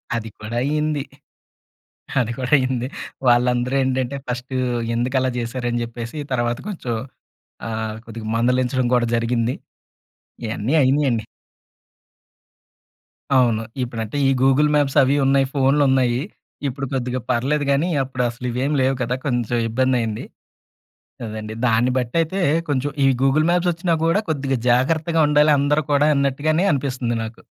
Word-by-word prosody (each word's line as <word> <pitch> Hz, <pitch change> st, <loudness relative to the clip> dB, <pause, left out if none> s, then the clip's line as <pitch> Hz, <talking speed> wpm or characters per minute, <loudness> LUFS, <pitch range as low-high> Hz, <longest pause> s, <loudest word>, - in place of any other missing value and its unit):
అది 115 Hz, -1 st, -4 dB
కూడా 110 Hz, +2 st, -5 dB
అయింది. 150 Hz, +1 st, 0 dB, 1.2 s
అది 120 Hz, -2 st, 0 dB
కూడా 125 Hz, -1 st, -3 dB
అయింది. 130 Hz, -2 st, -1 dB, 0.4 s
వాళ్ళందరూ 125 Hz, +1 st, +3 dB
ఏంటంటే 130 Hz, +1 st, -1 dB
ఫస్ట్ 125 Hz, +1 st, -5 dB, 0.4 s
"ఎందుకలా 130 Hz, +2 st, 0 dB
జేసారు?" 120 Hz, +1 st, -3 dB
అని 120 Hz, 0 st, -1 dB
జెప్పేసి 115 Hz, +3 st, -7 dB, 0.2 s
తర్వాత 120 Hz, -1 st, 0 dB
కొంచెం 145 Hz, -, -4 dB, 0.7 s
ఆహ్, 110 Hz, -1 st, -3 dB
కొద్దిగా 115 Hz, -1 st, -8 dB
మందలించడం 125 Hz, +1 st, +1 dB
కూడా 120 Hz, -1 st, +2 dB
జరిగింది. 115 Hz, +1 st, 0 dB, 0.9 s
ఇయన్నీ 110 Hz, +5 st, -2 dB
అయినియండి. 130 Hz, -4 st, +2 dB, 2.1 s
అవును. 115 Hz, -3 st, +2 dB, 0.2 s
ఇప్పుడంటే 115 Hz, +1 st, -4 dB
ఈ -, -, +4 dB
గూగుల్ 135 Hz, +3 st, +4 dB
మ్యాప్స్ 145 Hz, -1 st, +1 dB
అవి 135 Hz, +2 st, +2 dB
ఉన్నాయి. 135 Hz, 0 st, +3 dB
ఫోన్లు 140 Hz, +2 st, +3 dB
ఉన్నాయి. 125 Hz, -2 st, +2 dB, 0.5 s
ఇప్పుడు 135 Hz, +1 st, -4 dB
కొద్దిగా 125 Hz, -1 st, -1 dB
పర్లేదు 140 Hz, +5 st, 0 dB
గానీ 145 Hz, +6 st, +1 dB
అప్పుడు 130 Hz, -1 st, -3 dB
అసలు 120 Hz, +1 st, -8 dB
ఇవేమి 135 Hz, +5 st, -1 dB
లేవు 135 Hz, +1 st, +2 dB
కదా! 125 Hz, +1 st, 0 dB
కొంచెం 120 Hz, -3 st, 0 dB
ఇబ్బందయింది. 120 Hz, -2 st, 0 dB, 1.0 s
అదండి. 110 Hz, 0 st, -6 dB
దాన్ని 120 Hz, +2 st, +3 dB
బట్టి 120 Hz, -2 st, -2 dB
అయితే 165 Hz, +4 st, -2 dB, 0.3 s
కొంచెం 145 Hz, 0 st, 0 dB
ఈ -, -, +5 dB
గూగుల్ 135 Hz, +3 st, +3 dB
మాప్స్ 175 Hz, 0 st, +2 dB
ఒచ్చినా 170 Hz, +1 st, -1 dB
గూడా 165 Hz, +5 st, +3 dB
కొద్దిగా 140 Hz, -3 st, 0 dB
జాగ్రత్తగా 155 Hz, +7 st, +2 dB
ఉండాలి 150 Hz, +1 st, +4 dB
అందరూ 145 Hz, +2 st, +2 dB
కూడా 145 Hz, +1 st, +4 dB
అన్నట్టుగానే 145 Hz, +5 st, +1 dB
అనిపిస్తుంది 130 Hz, -3 st, -2 dB
నాకు. 110 Hz, +1 st, -8 dB
130 Hz, 130 wpm, -21 LUFS, 120-140 Hz, 2.1 s, ఈ